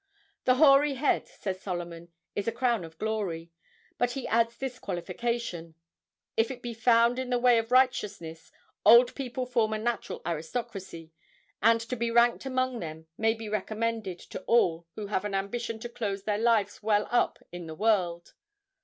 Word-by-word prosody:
"The 255 - +5
hoary 280 0 +6
head," 275 +3 +1
says 190 -2 -5
Solomon, 175 -2 -5 0.3
"is 205 - -2
a - - +2
crown 235 -4 0
of 160 -1 -11
glory;" 190 -6 -3 0.5
but 245 0 +1
he 270 - -4
adds 230 +1 +1
this 255 -1 -5
qualification, 180 -2 -4 0.6
"if 225 0 +2
it 250 -2 -7
be 240 -1 -4
found 235 +1 +3
in 260 -1 -3
the 250 - +2
way 240 -1 +5
of 225 +1 -5
righteousness." 205 -10 +1 0.3
Old 235 +3 +7
people 255 -1 -4
form 230 -3 +1
a - - 0
natural 230 +1 -3
aristocracy, 170 0 -5 0.5
and 230 +2 +5
to 235 +2 -4
be 235 -1 -1
ranked 235 +3 +3
among 255 -2 -1
them 160 -2 -7
may 225 +3 +2
be 225 -1 -7
recommended 215 -1 -2
to - - -5
all 170 -8 +3
who 210 - -5
have 200 -1 -1
an 205 -1 -3
ambition 225 +4 -3
to 240 - -4
close 210 -5 -4
their 210 0 -1
lives 220 -3 +2
well 210 -1 +2
up 240 - +2
in 175 -1 -7
the 160 - -7
world. 175 -4 0
225 Hz, 170 wpm, -28 LUFS, 190-240 Hz, 0.6 s, Old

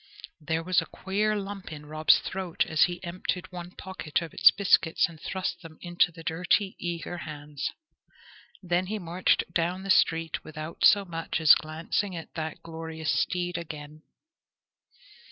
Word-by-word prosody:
There 160 +2 -2
was 185 +1 +3
a - - -8
queer 210 +3 -1
lump 200 -3 -5
in 150 -1 -8
Rob's 155 +1 +4
throat 185 -3 -2
as 160 - +4
he 175 0 -6
emptied 180 +1 -3
one 175 -1 -7
pocket 185 -4 -3
of 165 - -9
its - - +8
biscuits 185 -4 +3
and 165 -2 -14
thrust 190 -1 -3
them 160 -2 -12
into 175 0 +2
the 165 0 -12
dirty, 180 +4 +1
eager 175 0 -4
hands. 150 -3 -5 0.9
Then 180 +1 0
he 215 +2 -2
marched 180 -1 +1
down 175 +3 0
the 195 - 0
street 165 -3 +2
without 155 +1 -7
so 205 -2 +6
much 165 -2 -3
as 160 -2 +9
glancing 165 +5 -1
at 165 - -8
that 160 -2 -5
glorious 160 -1 -4
steed 175 +2 0
again. 155 -2 -8
170 Hz, 155 wpm, -28 LUFS, 160-185 Hz, 0.9 s, as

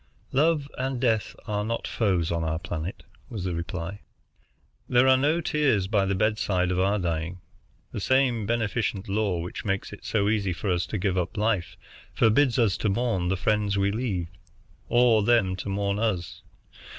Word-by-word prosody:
"Love 150 0 +2
and 130 -1 -2
death 115 -4 0
are 105 -1 -1
not 115 +2 -3
foes 95 -7 0
on 85 -1 -1
our 80 0 -1
planet," 85 +1 -5 0.3
was 110 -7 -5
the 90 -1 -2
reply. 85 +3 -5 0.9
"There 125 +1 +5
are 130 - +7
no 150 +6 +2
tears 145 - +1
by 100 -1 +1
the 100 - 0
bedsides 95 -3 +1
of 90 - 0
our 100 +3 +2
dying. 85 -1 -2 0.5
The - - -4
same 125 -2 +2
beneficent 115 -3 -1
law 100 -2 0
which 90 - -6
makes 100 -1 -2
it 100 - -11
so 100 -2 0
easy 100 -3 +1
for 95 +3 -2
us 85 -1 0
to 105 - -3
give 95 -1 0
up 90 +5 -3
life 105 -4 0 0.4
forbids 120 +3 +3
us 110 -7 +2
to 105 - 0
mourn 100 -4 0
the 95 +1 0
friends 105 +1 +1
we 100 0 +2
leave, 100 -7 -2 0.6
or 120 -2 +5
them 105 -4 +3
to 100 - -5
mourn 100 +1 -1
us. 100 -7 -2
105 Hz, 175 wpm, -26 LUFS, 95-115 Hz, 0.9 s, are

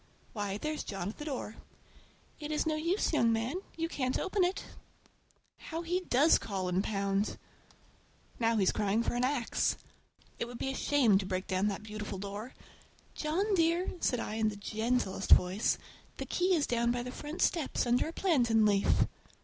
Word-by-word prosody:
Why, 205 -2 -2
there's 305 +6 -3
John 195 -2 -4
at 215 - -9
the 295 - -5
door! 255 -6 -4 0.8
It 300 0 -5
is 300 - 0
no 315 - +1
use, 335 +5 0
young 235 -6 +4
man, 230 +8 -1 0.2
you 330 0 0
can't 260 -6 -1
open 385 0 +1
it! 360 +2 0 1.0
How 330 +1 -5
he 350 +2 0
does 315 -3 +4
call 190 -3 -3
and 180 +2 +1
pound! 200 0 -1 1.0
Now 230 -1 +2
he's 190 -3 +3
crying 210 +2 +1
for - - -1
an 245 +1 0
axe. 255 -3 +1 0.6
It - - -1
would 240 0 -8
be 270 - -2
a - - -5
shame 245 -11 +3
to 195 - -3
break 185 -1 -2
down 190 +2 0
that 205 0 -3
beautiful 210 -2 -5
door! 205 +5 -6 0.6
"John 370 +8 0
dear!" 340 0 +2
said 250 - +1
I 215 -1 -4
in 220 -1 +2
the 210 - -6
gentlest 215 -1 -1
voice, 185 +5 +3 0.4
"the - - -4
key 365 +1 +2
is 300 -3 +2
down 235 0 +1
by 240 0 -1
the 250 - -6
front 295 +5 -3
steps, 320 -6 +1
under 245 +3 +2
a - - -4
plantain 240 - +3
leaf!" 200 -2 +3
240 Hz, 180 wpm, -31 LUFS, 205-310 Hz, 1.0 s, young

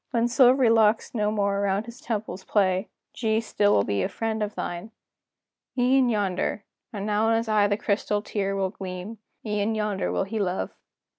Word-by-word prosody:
When 235 0 +1
silvery 250 -1 +5
locks 220 -1 +3
no 210 -3 +1
more 200 -2 0
around 200 +1 0
his 235 +2 -11
temples 215 -4 -4
play, 190 -1 +1 0.2
G 220 -2 0
still 210 -2 +1
will 100 - +4
be 100 -1 -1
a - - 0
friend 220 -1 -3
of 210 0 -2
thine!" 175 +5 -4 0.9
"E'en 255 +1 +4
yonder" 200 -2 -1 0.3
and 205 -2 -5
now 215 +1 +1
in 225 - +3
his 230 0 -2
eye 210 -2 +3
the 205 0 0
crystal 205 0 -1
tear 195 -2 -2
Will 190 -1 -1
gleam 190 +3 -7 0.3
"e'en 210 +1 0
yonder 210 -3 -1
he 220 +3 -4
will 200 - +2
love! 180 +1 -3
210 Hz, 180 wpm, -25 LUFS, 195-225 Hz, 0.9 s, silvery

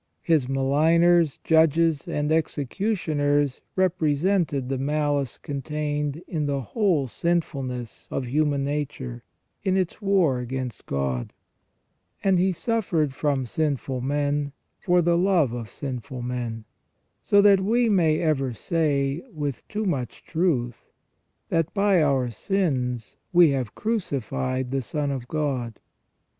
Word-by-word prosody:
His 155 -7 +2
maligners, 155 +4 +3
judges, 160 -1 +3
and 150 +1 -1
executioners 145 - 0
represented 165 -4 +1
the 135 0 -2
malice 145 -1 0
contained 150 +2 -3
in 155 -4 -2
the 140 -1 0
whole 175 - +1
sinfulness 130 - -3
of 130 - -2
human 145 +2 +1
nature, 140 - -4 0.4
in 190 0 +1
its 185 +3 -2
war 185 -10 +2
against 125 0 -5
God; 65 -3 -2 0.9
and 190 -2 +3
He 190 +1 +3
suffered 175 - 0
from 140 -2 0
sinful 135 -2 -1
men 145 +1 -1 0.3
for 180 -1 +3
the 170 +1 +3
love 175 -9 +3
of 115 -3 -5
sinful 130 -2 -6
men; 120 -3 -4 0.6
so 205 - +4
that 200 -1 +6
we 235 +5 +2
may 165 -7 +3
ever 135 -6 0
say, 145 - 0
with 145 - -4
too 215 +1 -3
much 135 - -3
truth, 145 -9 -1 0.7
that 165 -1 +1
by 200 -3 +4
our 135 -5 +2
sins 130 - -1
we 175 -4 +6
have 130 -7 -2
crucified 130 - -2
the 135 0 0
Son 145 +3 -2
of 130 -3 -4
God. 130 -7 -2
145 Hz, 125 wpm, -25 LUFS, 130-170 Hz, 0.9 s, that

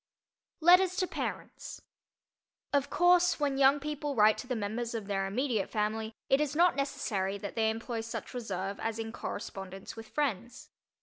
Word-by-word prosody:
LETTERS 360 +2 +6
TO 370 - +1
PARENTS - - -6 0.9
Of 285 -1 +2
course, 355 0 +4
when 280 -2 0
young 275 +1 +6
people 295 0 -3
write 215 -1 +6
to 250 - -7
the 250 - -1
members 230 +2 -3
of 220 -3 -4
their 195 -1 -1
immediate 225 -1 -1
family, 220 +1 -2
it 270 +2 +3
is 295 -1 -1
not 350 +2 +4
necessary 200 -8 -1
that 200 0 -6
they 220 -1 +2
employ 225 +1 -3
such 225 +1 -6
reserve 200 -5 -4
as 225 0 -2
in 225 0 -4
correspondence 195 -4 -6
with 225 -1 -9
friends. 265 +2 -3
230 Hz, 165 wpm, -31 LUFS, 210-285 Hz, 0.9 s, LETTERS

